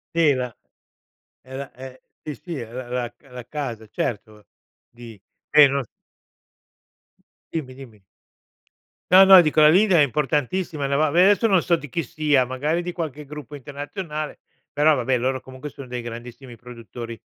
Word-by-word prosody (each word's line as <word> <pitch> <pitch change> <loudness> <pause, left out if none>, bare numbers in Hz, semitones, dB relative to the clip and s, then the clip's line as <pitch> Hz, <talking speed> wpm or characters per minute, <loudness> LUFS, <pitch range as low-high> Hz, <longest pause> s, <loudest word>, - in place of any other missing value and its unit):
Sì 160 -4 +4
la 125 -2 -4 0.9
è 130 +1 -11
la 140 0 -7
è 130 0 -11 0.2
sì, 150 - -6
sì, 165 +2 -7
la 120 +2 -8
la 125 -1 -3
c - - -39
la 125 -1 -9
casa, 120 -8 -5
certo, 105 0 -5 0.4
di 115 -3 -13 0.3
si, 150 -1 +8
no 140 0 -1
s - - -18 1.7
Dimmi, 130 -6 -4
dimmi. 110 -7 -13 1.1
No, 190 +1 +9
no, 190 -1 +10
dico 155 -1 +2
la 150 - +8
Lindt 190 +4 +4
è 165 - +6
importantissima 150 +3 -1
no, 140 0 0
va 155 0 +2
ve 175 +2 +5
adesso, 205 +3 +4
non 190 -5 +3
so 170 -2 +2
di 150 - -9
chi 165 +6 -3
sia, 145 -1 +1
magari 145 +7 -1
di 180 - -5
qualche 155 -4 -5
gruppo 150 0 -9
internazionale, 150 +3 -6 0.3
però 150 +1 +4
vabbè 125 0 0
loro 130 +2 -1
comunque 130 +3 -10
sono 140 -2 -11
dei 125 0 -5
grandissimi 120 +1 -9
produttori, 115 -1 -9
140 Hz, 165 wpm, -23 LUFS, 125-155 Hz, 1.7 s, no